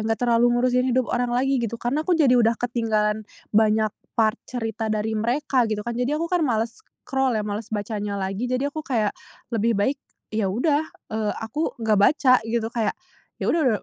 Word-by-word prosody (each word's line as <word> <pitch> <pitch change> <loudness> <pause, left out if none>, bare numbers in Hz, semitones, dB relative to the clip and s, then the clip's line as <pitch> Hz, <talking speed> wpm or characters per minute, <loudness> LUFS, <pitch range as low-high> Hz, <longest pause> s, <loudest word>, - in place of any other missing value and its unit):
nggak 225 - 0
terlalu 235 0 +4
ngurusin 250 +1 +2
hidup 255 - +3
orang 245 0 +1
lagi 270 +1 +2
gitu, 235 0 -2
karena 245 +6 -1
aku 360 - +3
jadi 280 -6 +4
udah 230 0 +4
ketinggalan 220 -3 0 0.3
banyak 215 0 +3 0.2
part 225 0 +2
cerita 225 -2 -3
dari 215 0 -1
mereka, 250 +2 +1
gitu, 215 -1 -2
kan. 235 - -4
Jadi 250 +4 0
aku 335 +3 -2
kan 360 - +2
males 225 -1 0
scroll, 265 - -2
ya, 215 - 0
males 210 +1 -4
bacanya 205 -1 -3
lagi, 195 +4 -2
jadi 255 +3 -1
aku 310 - -4
kayak 220 -6 +1 0.4
lebih 230 0 +2
baik 265 +8 +1 0.3
ya 215 -2 0
udah, 285 - +2 0.3
eee, 215 -1 0
aku 295 +9 -2
nggak 215 -2 +3
baca 255 +3 +5
gitu. 225 0 -1
Kayak 225 -3 0 0.5
ya - - +2
udah, 265 -10 +2
230 Hz, 185 wpm, -24 LUFS, 215-255 Hz, 0.5 s, baca